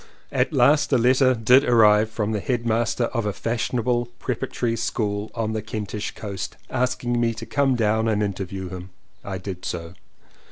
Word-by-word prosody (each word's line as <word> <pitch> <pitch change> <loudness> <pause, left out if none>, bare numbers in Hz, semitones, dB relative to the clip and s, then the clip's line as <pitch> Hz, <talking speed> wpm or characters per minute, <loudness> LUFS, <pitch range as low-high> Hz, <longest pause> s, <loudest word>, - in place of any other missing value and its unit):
At - - +1
last 145 0 +4
a 130 - +5
letter 130 +2 +4
did 125 +4 +5
arrive 110 -4 +5
from 110 -1 -2
the 105 - -1
headmaster 115 +1 0
of 115 -4 -1
a - - +1
fashionable 120 +2 -1
preparatory 120 -2 -2
school 105 -2 -2
on 110 -2 -1
the 110 - -2
Kentish 105 0 -4
coast, 100 -4 -6
asking 125 -1 0
me 115 -1 +1
to - - -7
come 140 -2 +1
down 110 -1 +1
and 105 -1 +1
interview 95 -1 -4
him. 90 0 -8 0.3
I 95 -1 -4
did 90 -1 -7
so. 85 -1 -5
110 Hz, 165 wpm, -23 LUFS, 105-120 Hz, 0.3 s, a